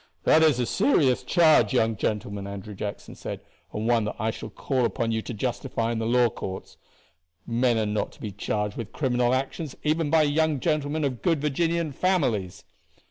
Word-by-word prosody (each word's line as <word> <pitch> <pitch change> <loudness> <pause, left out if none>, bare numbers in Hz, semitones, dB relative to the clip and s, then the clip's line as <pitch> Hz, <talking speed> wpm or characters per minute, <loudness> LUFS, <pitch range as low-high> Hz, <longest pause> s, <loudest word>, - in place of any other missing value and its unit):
"This 160 - +5
is - - -4
a 125 - +1
serious 150 - +2
charge, 160 -5 +4
young 115 -3 +2
gentleman," 100 -1 -3
Andrew 100 +1 -7
Jackson 100 +1 -6
said, - - -6 0.3
"and 110 +2 -3
one 120 -2 +3
that 105 - -3
I 110 +2 0
shall - - -8
call 130 -3 -1
upon 115 -1 0
you 110 0 0
to - - -7
justify 115 0 -2
in 115 - -2
the 110 - -1
law 120 +1 +4
courts. 95 -2 -7 0.7
Men 120 0 +1
are 110 - +1
not 105 0 -1
to - - -19
be 105 - -5
charged 105 +1 -3
with 115 -2 -6
criminal 125 -3 +1
actions 135 +2 -3
even 155 0 +1
by 160 0 +4
young 150 0 +1
gentlemen 155 0 0
of 130 -4 -2
good 165 -4 +2
Virginian 165 +2 0
families." 125 - 0
125 Hz, 190 wpm, -26 LUFS, 110-150 Hz, 0.7 s, This